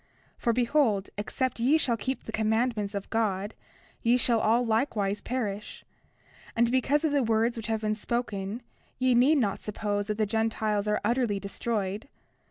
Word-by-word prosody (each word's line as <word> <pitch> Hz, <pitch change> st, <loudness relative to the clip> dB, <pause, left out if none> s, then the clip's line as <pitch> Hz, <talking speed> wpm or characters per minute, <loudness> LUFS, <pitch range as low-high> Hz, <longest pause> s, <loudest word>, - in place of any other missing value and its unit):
For 235 Hz, -, 0 dB
behold, 235 Hz, -4 st, +1 dB
except 235 Hz, +4 st, -2 dB
ye 265 Hz, +7 st, +4 dB
shall 250 Hz, -7 st, +1 dB
keep 255 Hz, +4 st, -3 dB
the -, -, -7 dB
commandments 220 Hz, -1 st, 0 dB
of 200 Hz, -, -5 dB
God 205 Hz, -2 st, 0 dB, 0.5 s
ye 235 Hz, +2 st, +4 dB
shall 235 Hz, -2 st, +3 dB
all 230 Hz, +3 st, +3 dB
likewise 220 Hz, -3 st, 0 dB
perish; 215 Hz, -5 st, -4 dB, 0.7 s
and 235 Hz, +1 st, +3 dB
because 270 Hz, +4 st, +2 dB
of 315 Hz, -, +2 dB
the 285 Hz, -1 st, +3 dB
words 230 Hz, +1 st, +1 dB
which 230 Hz, -1 st, -5 dB
have 220 Hz, -1 st, -1 dB
been 215 Hz, -1 st, 0 dB
spoken 215 Hz, -1 st, -3 dB, 0.3 s
ye 255 Hz, 0 st, +3 dB
need 260 Hz, +6 st, +5 dB
not 210 Hz, -7 st, 0 dB
suppose 205 Hz, -1 st, -2 dB
that 210 Hz, -1 st, -2 dB
the 215 Hz, -, +2 dB
Gentiles 215 Hz, -1 st, 0 dB
are 210 Hz, 0 st, +1 dB
utterly 235 Hz, -3 st, +1 dB
destroyed. 205 Hz, +2 st, -3 dB
225 Hz, 165 wpm, -28 LUFS, 210-245 Hz, 0.7 s, need